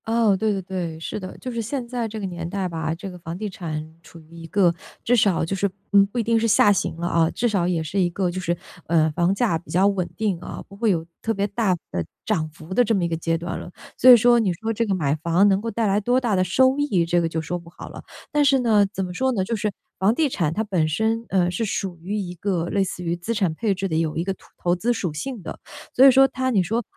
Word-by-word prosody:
哦， 225 -3 +3
对 215 +2 0
对 195 -2 -2
对， 175 -3 -4
是 165 - -5
的。 185 -2 -8
就 255 - -6
是 235 -1 -3
现 245 +3 -3
在 240 -2 -2
这 220 0 -6
个 200 - -4
年 170 -2 -5
代 195 0 -2
吧， 160 -2 -3
这 190 +4 -8
个 180 -1 -10
房 165 0 -6
地 210 +2 -4
产 160 -4 -6
处 170 - -14
于 160 +1 -17
一 165 -1 -9
个 175 0 +3 0.3
至 245 - +3
少 195 -8 +2
就 195 - -2
是 200 +1 0 0.2
嗯， 200 -1 +7
不 210 - -8
一 235 - +1
定 230 0 +2
是 230 - +1
下 205 -1 +5
行 190 - -2
了 170 +1 -3
啊， 165 -2 +2
至 240 - -1
少 195 -6 +1
也 170 -3 0
是 170 +6 -2
一 180 -2 +3
个 180 0 -1
就 185 - -4
是， 170 -1 -1 0.3
呃， 160 -1 +3
房 175 +4 +1
价 200 -7 +1
比 175 - -22
较 185 +3 +3
稳 195 -3 0
定 205 -6 -1
啊， - - -8
不 200 - -13
会 220 +2 +1
有 165 -4 0 0.2
特 225 - -1
别 200 0 0
大 200 -2 +1 0.2
的 85 - -2 0.2
涨 155 -1 0
幅 155 +3 -10
的 245 - +4
这 225 -1 +1
么 190 - 0
一 - - +1
个 165 - -2
阶 165 0 -1
段 170 +1 -5
了。 - - -8 0.3
所 255 - +6
以 245 - +11
说 240 +1 +5
你 205 -5 +1
说 220 +5 -3
这 230 +2 0
个 195 - +1
买 145 -6 0
房 170 +5 +3
能 195 0 +2
够 230 - -3
带 225 0 -1
来 200 0 +2
多 245 +5 +2
大 235 -5 0
的 185 - +2
收 260 +9 +3
益， 200 -13 +1
这 175 +1 +2
个 165 - 0
就 160 - -2
说 170 +3 -3
不 170 0 -14
好 175 - -11
了。 - - -10 0.3
但 295 -1 +3
是 280 -1 +4
呢， 220 -4 +4
怎 195 -2 -3
么 180 - -7
说 260 +8 0
呢， 195 -5 0
就 230 +5 -2
是 210 -1 -1 0.3
房 200 +4 +3
地 315 +1 +2
产 170 - -1
它 210 +7 -1
本 185 -7 0
身， 220 +8 0
呃， 180 -2 +2
是 180 +6 -2
属 195 -4 -3
于 200 +5 -3
一 185 -4 -4
个 175 -1 -2
类 200 - +1
似 180 -1 -5
于 170 0 -1
资 195 +7 -4
产 190 -6 +1
配 205 +3 0
置 195 +1 -2
的， 160 - -2
有 160 -1 -1
一 165 - 0
个 195 +1 -2
土 - - -20
投 175 0 +1
资 220 +7 0
属 180 -8 -3
性 210 - -5
的。 - - -7 0.3
所 255 - +5
以 - - +10
说 270 +1 +6
它 260 -1 -2
你 205 -7 +2
说， 225 +7 -1
190 Hz, 310 characters per minute, -23 LUFS, 170-225 Hz, 0.3 s, 以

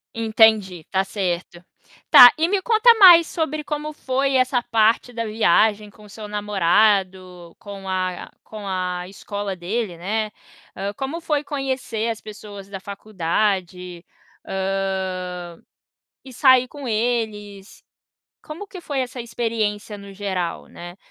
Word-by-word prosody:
Entendi, 220 -6 +2
tá 190 0 +1
certo. 180 -3 -4 0.5
Tá, 245 -1 +10
e 320 +1 +2
me 390 +1 0
conta 460 +3 +5
mais 345 -4 +9
sobre 310 -2 -3
como 300 0 -5
foi 270 -1 -1
essa 255 -1 +2
parte 230 +1 +1
da 230 0 -3
viagem 215 0 +2
com 210 +1 -19
o - - -16
seu 215 +1 -9
namorado, 190 -3 0
com 200 -2 -10
a 185 -1 -3
com 210 -2 -9
a 180 -1 -3
escola 200 0 -6
dele, 185 +1 -4
né, 210 +4 -2 0.4
ah, 200 +1 -4
como 280 +5 -5
foi 300 -3 -1
conhecer 260 -6 -3
as 225 - -5
pessoas 205 -2 -11
da 195 -1 -7
faculdade? 185 -2 -3 0.4
Hã, 190 -2 -3 0.7
e 260 - -11
sair 255 0 +4
com 280 -1 -9
eles, 215 -3 -3 0.6
como 325 +7 -9
que 370 - -10
foi 285 -5 -3
essa 250 -1 -5
experiência 225 -3 -3
no 200 0 -11
geral, 190 -4 -4
né, 175 +1 -11
210 Hz, 135 wpm, -21 LUFS, 190-245 Hz, 0.7 s, Tá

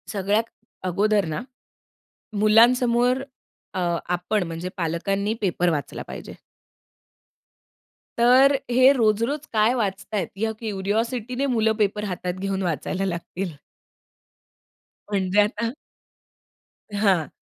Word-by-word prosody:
सगळ्यात 205 +1 +1 0.4
अगोदर 200 +2 +2
ना, - - -3 1.0
मुलांसमोर 240 +4 +4 0.5
अ, 185 - -1 0.3
आपण 180 +4 0
म्हणजे 165 +1 -4
पालकांनी 195 +4 -1
पेपर 180 -3 +1
वाचला 145 -4 -3
पाहिजे. - - -8 1.8
तर 260 +4 +6
हे 255 +2 +6
रोज-रोज 235 +5 +1
काय 220 +2 +4
वाचत 200 -3 -3
आहेत, 195 -6 0
ह्या 220 +2 0
क्युरिओसिटीने 225 +5 -2
मुलं 220 -1 +3
पेपर 210 +1 -1
हातात 180 -2 -3
घेऊन 195 0 -2
वाचायला 180 +3 -2
लागतील. 180 0 -4 1.6
म्हणजे 195 -1 +1
आता 215 +2 -1 1.3
हां. 190 -7 +3
210 Hz, 95 wpm, -24 LUFS, 185-230 Hz, 1.8 s, तर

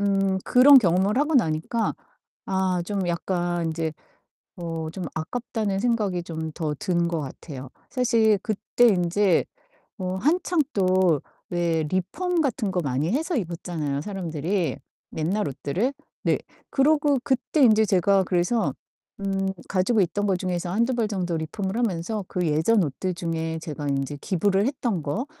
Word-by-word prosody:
음 195 -1 +2
그런 270 +3 +8
경험을 190 +2 +2
하고 300 +1 +1
나니까 215 +2 +1 0.5
아 190 -2 0
좀 195 -2 -2
약간 175 -1 -1
인제 160 -1 -2 0.7
'어 165 -2 -4
좀 190 - -5
아깝다.'는 215 +3 -2
생각이 210 -7 0
좀 160 -2 -5
더 155 -3 -2
든 170 +2 0
것 165 -2 -1
같아요. 135 -1 -8 0.2
사실 230 -5 +3
그때 230 +2 +2
인제 185 -1 +3 0.5
어 185 0 -2
한창 345 +2 +2
또 185 -5 +3 0.3
왜 170 -2 +1
리폼 320 - -1
같은 225 -8 0
거 180 - +1
많이 145 - -1
해서 320 +4 0
입었잖아요, 165 - -3
사람들이 175 -1 -2 0.4
옛날 180 +6 0
옷들을? 160 - -1 0.3
네. - - +2 0.3
그러고 290 0 +3
그때 265 +3 +1
인제 220 -3 +6
제가 195 0 +3
그래서 180 - +1 0.5
음 195 -1 -1 0.2
가지고 205 +4 +2
있던 205 +3 0
거 195 - +2
중에서 175 -1 -2
1-2 235 +5 +1
벌 230 -3 +1
정도 180 -5 -2
리폼을 190 +6 -3
하면서 210 -2 -1
그 180 -1 -1
예전 160 +8 +3
옷들 180 +6 -3
중에 165 -1 -3
제가 150 -2 -5
인제 140 +1 -1
기부를 195 +3 +1
했던 240 - -1
거 205 - -2
185 Hz, 275 characters per minute, -25 LUFS, 165-220 Hz, 0.7 s, 그런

